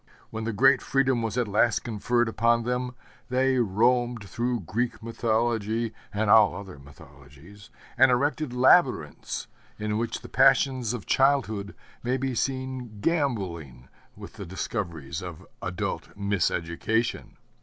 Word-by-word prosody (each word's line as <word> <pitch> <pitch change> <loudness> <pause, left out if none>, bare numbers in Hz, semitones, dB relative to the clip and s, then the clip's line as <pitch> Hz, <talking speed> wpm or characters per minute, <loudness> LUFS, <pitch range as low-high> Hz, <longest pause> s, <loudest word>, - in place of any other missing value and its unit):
When 110 0 -4
the 115 - -1
great 135 +5 +4
freedom 135 -3 +1
was 115 +1 -3
at 120 -3 +1
last 105 +2 +2
conferred 120 +2 0
upon 115 +1 +2
them, 125 +1 -2 0.3
they 130 +1 +2
roamed 120 +1 +1
through 120 +3 -2
Greek 115 +7 -3
mythology, 115 -1 -1 0.2
and 105 +1 -1
all 105 0 +6
other 95 -7 -9
mythologies, 75 +6 -16 0.3
and 135 - +7
erected 140 +3 0
labyrinths 125 - +2 0.3
in 105 0 -2
which 115 0 -3
the - - -10
passions 130 -4 +3
of 105 - -8
childhood 120 -7 +1 0.3
may 125 +2 0
be 135 0 -2
seen 130 -3 -3
gamboling 95 - -2 0.3
with - - -11
the - - -6
discoveries 85 - -4
of 90 0 -8 0.2
adult 90 +2 -4
miseducation. 100 +3 -1
115 Hz, 130 wpm, -26 LUFS, 100-125 Hz, 0.3 s, and